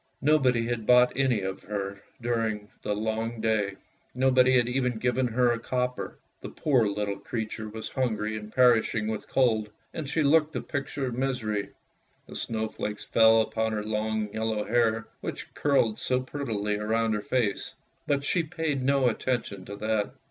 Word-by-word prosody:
Nobody 130 Hz, -6 st, +3 dB
had 115 Hz, -2 st, -3 dB
bought 125 Hz, 0 st, +6 dB
any 130 Hz, -5 st, +2 dB
of 95 Hz, 0 st, -4 dB
her 100 Hz, -1 st, -4 dB, 0.2 s
during 115 Hz, -3 st, -1 dB
all 105 Hz, -, -21 dB
the 105 Hz, -, -1 dB
long 110 Hz, +2 st, -2 dB
day; 110 Hz, -3 st, +1 dB, 0.4 s
nobody 130 Hz, 0 st, +4 dB
had 120 Hz, -1 st, +3 dB
even 125 Hz, -1 st, 0 dB
given 125 Hz, +2 st, +1 dB
her 120 Hz, +1 st, +3 dB
a 115 Hz, -, -1 dB
copper. 125 Hz, +1 st, -2 dB, 0.2 s
The -, -, -6 dB
poor 130 Hz, -8 st, +2 dB
little 100 Hz, 0 st, -2 dB
creature 110 Hz, 0 st, -4 dB
was 110 Hz, +1 st, -6 dB
hungry 110 Hz, -5 st, -1 dB
and 105 Hz, 0 st, -7 dB
perishing 115 Hz, -3 st, +4 dB
with 110 Hz, -1 st, -4 dB
cold, 110 Hz, -5 st, +2 dB, 0.2 s
and 150 Hz, -4 st, -4 dB
she 155 Hz, +1 st, +1 dB
looked 155 Hz, +2 st, +4 dB
the -, -, -2 dB
picture 140 Hz, 0 st, -3 dB
of 125 Hz, -, -3 dB
misery. 120 Hz, -5 st, -1 dB, 0.6 s
The -, -, -11 dB
snowflakes 110 Hz, -2 st, -3 dB
fell 115 Hz, 0 st, +6 dB
upon 110 Hz, 0 st, -1 dB
her 105 Hz, -1 st, -2 dB
long 110 Hz, -1 st, -1 dB
yellow 110 Hz, -1 st, -1 dB
hair, 115 Hz, 0 st, +1 dB
which -, -, -6 dB
curled 135 Hz, -7 st, +2 dB
so 125 Hz, 0 st, +1 dB
prettily 110 Hz, -7 st, -2 dB
round 110 Hz, +1 st, +1 dB
her 105 Hz, -, -1 dB
face, 110 Hz, -3 st, -1 dB, 0.3 s
but 140 Hz, -1 st, +1 dB
she 170 Hz, +4 st, +1 dB
paid 155 Hz, -3 st, -2 dB
no 135 Hz, 0 st, +3 dB
attention 115 Hz, -5 st, -2 dB
to 100 Hz, -, -7 dB
that. 110 Hz, 0 st, -1 dB
115 Hz, 170 wpm, -27 LUFS, 110-130 Hz, 0.6 s, bought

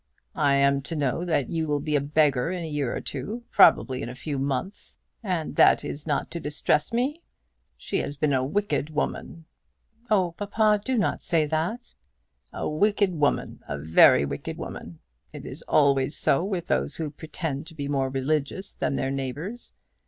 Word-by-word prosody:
I 140 Hz, -1 st, +4 dB
am 140 Hz, 0 st, +3 dB
to 165 Hz, -, -3 dB
know 145 Hz, +2 st, 0 dB
that 150 Hz, -7 st, 0 dB
you 160 Hz, -1 st, -1 dB
will 145 Hz, -1 st, 0 dB
be 150 Hz, +1 st, -1 dB
a 145 Hz, -, +3 dB
beggar 145 Hz, -1 st, +2 dB
in 180 Hz, -2 st, -3 dB
a -, -, -4 dB
year 145 Hz, -5 st, -2 dB
or -, -, -3 dB
two, 210 Hz, -, -4 dB
probably 130 Hz, -1 st, +5 dB
in 120 Hz, -, -4 dB
a 125 Hz, -, -8 dB
few 140 Hz, +1 st, -4 dB
months, 140 Hz, +8 st, -3 dB, 0.3 s
and 180 Hz, -7 st, -2 dB
that -, -, +5 dB
is 145 Hz, +2 st, -6 dB
not 145 Hz, -2 st, -1 dB
to 170 Hz, -, -4 dB
distress 150 Hz, 0 st, 0 dB
me! 265 Hz, +8 st, -1 dB, 0.6 s
She -, -, -2 dB
has 145 Hz, -, -4 dB
been 150 Hz, -1 st, +1 dB
a 130 Hz, -1 st, +2 dB
wicked 195 Hz, 0 st, -1 dB
woman!" 155 Hz, +1 st, -4 dB, 0.6 s
"Oh, 190 Hz, -5 st, +3 dB
papa, 210 Hz, +3 st, +1 dB
do 260 Hz, +1 st, -1 dB
not 210 Hz, -, 0 dB
say 160 Hz, -3 st, +1 dB
that." 165 Hz, +11 st, -3 dB, 0.6 s
"A -, -, -4 dB
wicked 200 Hz, +4 st, +2 dB
woman. 150 Hz, -3 st, 0 dB
A 70 Hz, -, -3 dB
very 70 Hz, -1 st, +5 dB
wicked -, -, -5 dB
woman. 85 Hz, -1 st, -8 dB, 0.4 s
It -, -, -9 dB
is -, -, -8 dB
always 140 Hz, -1 st, +3 dB
so 140 Hz, -, +2 dB
with 190 Hz, -3 st, -2 dB
those 65 Hz, +2 st, 0 dB
who 155 Hz, -3 st, -3 dB
pretend 155 Hz, -1 st, -5 dB
to 165 Hz, -, -11 dB
be 140 Hz, -2 st, -4 dB
more 135 Hz, -2 st, 0 dB
religious 145 Hz, +7 st, -2 dB
than -, -, -2 dB
their 135 Hz, -, -1 dB
neighbours. 145 Hz, -, -5 dB
150 Hz, 180 wpm, -26 LUFS, 140-175 Hz, 0.6 s, probably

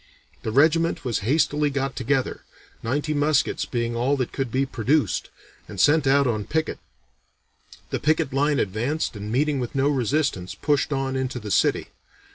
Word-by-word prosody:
The 110 Hz, -, -3 dB
regiment 160 Hz, +5 st, +3 dB
was 120 Hz, -3 st, 0 dB
hastily 145 Hz, +5 st, +1 dB
got 135 Hz, -1 st, -2 dB
together, 130 Hz, +1 st, -1 dB, 0.4 s
ninety 145 Hz, +6 st, -1 dB
muskets 145 Hz, 0 st, +1 dB
being 120 Hz, -1 st, -2 dB
all 130 Hz, +4 st, +1 dB
that 130 Hz, -3 st, -2 dB
could 135 Hz, -4 st, -3 dB
be 135 Hz, +3 st, +1 dB
produced, 135 Hz, +4 st, 0 dB, 0.4 s
and 100 Hz, -3 st, -8 dB
sent 150 Hz, -, +4 dB
out 140 Hz, +1 st, +4 dB
on 110 Hz, -4 st, -1 dB
picket. 160 Hz, 0 st, -2 dB, 1.1 s
The -, -, -1 dB
picket 155 Hz, -2 st, +1 dB
line 145 Hz, +1 st, +2 dB
advanced 120 Hz, +10 st, -1 dB
and 105 Hz, +1 st, -6 dB
meeting 145 Hz, +3 st, +1 dB
with 125 Hz, +2 st, -4 dB
no 135 Hz, +1 st, +2 dB
resistance 130 Hz, -7 st, -1 dB
pushed 145 Hz, 0 st, 0 dB
on 135 Hz, -1 st, -1 dB
into 130 Hz, -1 st, -2 dB
the 105 Hz, -2 st, -6 dB
city. -, -, +2 dB
135 Hz, 160 wpm, -24 LUFS, 120-150 Hz, 1.1 s, sent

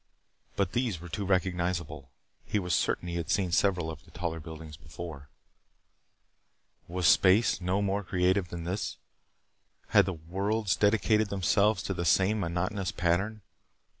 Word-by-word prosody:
But 95 Hz, -3 st, 0 dB
these 120 Hz, -8 st, -1 dB
were 90 Hz, +1 st, -10 dB
too 100 Hz, +4 st, -3 dB
recognizable. 85 Hz, -6 st, -1 dB, 0.3 s
He -, -, -1 dB
was 90 Hz, -3 st, -1 dB
certain -, -, 0 dB
that 90 Hz, -, -4 dB
he 85 Hz, -, -3 dB
had 85 Hz, 0 st, -4 dB
seen 100 Hz, -4 st, +1 dB
several 90 Hz, -2 st, +1 dB
of 75 Hz, -5 st, -11 dB
the -, -, -20 dB
taller 80 Hz, 0 st, -4 dB
buildings 80 Hz, -1 st, -9 dB
before. 75 Hz, -2 st, -9 dB, 1.6 s
Was 90 Hz, 0 st, -2 dB
space 95 Hz, +7 st, +5 dB
no 95 Hz, +3 st, 0 dB
more 100 Hz, +1 st, 0 dB
creative 90 Hz, +1 st, +1 dB
than 85 Hz, -1 st, -6 dB
this? 90 Hz, +5 st, -3 dB, 0.9 s
Had -, -, +5 dB
the 95 Hz, -, -1 dB
worlds 95 Hz, +6 st, -1 dB
dedicated 105 Hz, 0 st, +2 dB
themselves 100 Hz, +1 st, +2 dB
to 95 Hz, -, -2 dB
the 85 Hz, -2 st, -3 dB
same 95 Hz, +7 st, +3 dB
monotonous 90 Hz, +2 st, -2 dB
pattern? 95 Hz, +5 st, 0 dB
90 Hz, 150 wpm, -29 LUFS, 85-100 Hz, 1.6 s, space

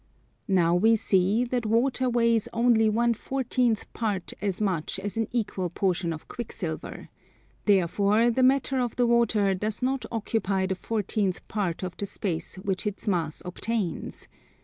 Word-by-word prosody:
Now 175 Hz, -3 st, +3 dB
we 220 Hz, +6 st, +5 dB
see 205 Hz, +1 st, +2 dB
that 245 Hz, 0 st, -1 dB
water 250 Hz, +3 st, +2 dB
weighs 230 Hz, -2 st, +2 dB
only 230 Hz, -2 st, +4 dB
one 235 Hz, +2 st, +2 dB
fourteenth 245 Hz, -2 st, -1 dB
part 205 Hz, -6 st, -2 dB
as 200 Hz, -3 st, -1 dB
much 190 Hz, -7 st, -1 dB
as 200 Hz, +1 st, -5 dB
an 225 Hz, -1 st, 0 dB
equal 205 Hz, -6 st, -1 dB
portion 180 Hz, -2 st, 0 dB
of 155 Hz, -1 st, -7 dB
quicksilver: 185 Hz, -8 st, -6 dB, 0.6 s
therefore 205 Hz, +4 st, +3 dB
the 260 Hz, -, 0 dB
matter 265 Hz, +1 st, +3 dB
of 245 Hz, -2 st, -1 dB
the 245 Hz, -, +2 dB
water 230 Hz, -4 st, +3 dB
does 210 Hz, +5 st, -3 dB
not 265 Hz, 0 st, 0 dB
occupy 205 Hz, -4 st, 0 dB
the 190 Hz, -, -1 dB
fourteenth 200 Hz, -1 st, -2 dB
part 190 Hz, -5 st, -2 dB
of 180 Hz, -1 st, -4 dB
the 200 Hz, -, -3 dB
space 175 Hz, -4 st, -4 dB
which 190 Hz, +1 st, -2 dB
its 205 Hz, +1 st, -5 dB
mass 165 Hz, -6 st, -1 dB
obtains. 185 Hz, 0 st, -3 dB
210 Hz, 150 wpm, -27 LUFS, 190-235 Hz, 0.6 s, we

